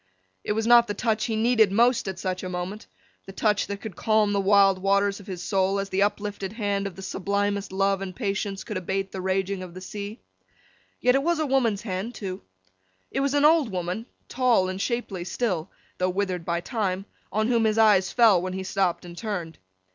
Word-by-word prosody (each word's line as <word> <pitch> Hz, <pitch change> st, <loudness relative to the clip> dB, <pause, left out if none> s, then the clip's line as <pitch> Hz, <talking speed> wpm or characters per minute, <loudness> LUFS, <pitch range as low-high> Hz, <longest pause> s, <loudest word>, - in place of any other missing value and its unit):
It -, -, -1 dB
was 220 Hz, +1 st, -1 dB
not 235 Hz, 0 st, +6 dB
the 205 Hz, -, -3 dB
touch 220 Hz, 0 st, 0 dB
he 225 Hz, -, -1 dB
needed 220 Hz, -2 st, +3 dB
most 235 Hz, +2 st, +3 dB
at 190 Hz, -1 st, -4 dB
such 185 Hz, 0 st, -3 dB
a 185 Hz, -, -5 dB
moment—the 185 Hz, +1 st, -8 dB
touch 210 Hz, 0 st, +1 dB
that 200 Hz, -1 st, -5 dB
could 215 Hz, -6 st, -7 dB
calm 215 Hz, 0 st, +2 dB
the 200 Hz, -, +1 dB
wild 195 Hz, -1 st, +5 dB
waters 200 Hz, +1 st, +2 dB
of 200 Hz, -, -14 dB
his 185 Hz, -3 st, -6 dB
soul, 195 Hz, 0 st, +1 dB
as 195 Hz, 0 st, -3 dB
the 190 Hz, 0 st, 0 dB
uplifted 205 Hz, -1 st, -1 dB
hand 200 Hz, -3 st, -1 dB
of 190 Hz, -, -8 dB
the 190 Hz, -, -9 dB
sublimest 200 Hz, +1 st, -1 dB
love 195 Hz, 0 st, +1 dB
and 185 Hz, -2 st, -5 dB
patience 200 Hz, -3 st, -2 dB
could 210 Hz, -, -4 dB
abate 190 Hz, +1 st, -2 dB
the 190 Hz, -, -5 dB
raging 190 Hz, +1 st, -1 dB
of 180 Hz, -1 st, -9 dB
the -, -, -6 dB
sea—yet 210 Hz, +4 st, -5 dB
it 270 Hz, -, +3 dB
was 340 Hz, +3 st, +1 dB
a 310 Hz, -, 0 dB
woman's 240 Hz, -7 st, +1 dB
hand 200 Hz, +3 st, -4 dB
too. 190 Hz, -3 st, -5 dB, 0.7 s
It -, -, -1 dB
was 280 Hz, +1 st, +1 dB
an 290 Hz, 0 st, +4 dB
old 310 Hz, -5 st, +5 dB
woman, 185 Hz, +5 st, -3 dB, 0.2 s
tall 240 Hz, -7 st, +2 dB
and 185 Hz, +1 st, -4 dB
shapely 230 Hz, -7 st, -2 dB
still, 180 Hz, -3 st, -2 dB, 0.3 s
though 185 Hz, 0 st, +2 dB
withered 185 Hz, -2 st, -2 dB
by 170 Hz, 0 st, -1 dB
time, 195 Hz, -2 st, -2 dB, 0.3 s
on 215 Hz, +2 st, 0 dB
whom 230 Hz, -2 st, +3 dB
his 215 Hz, 0 st, +1 dB
eyes 210 Hz, -4 st, +5 dB
fell 220 Hz, -7 st, +5 dB
when 185 Hz, 0 st, -4 dB
he 190 Hz, 0 st, -4 dB
stopped 185 Hz, -2 st, -1 dB
and 170 Hz, -1 st, -9 dB
turned. 175 Hz, -6 st, -5 dB
200 Hz, 205 wpm, -25 LUFS, 185-220 Hz, 0.7 s, not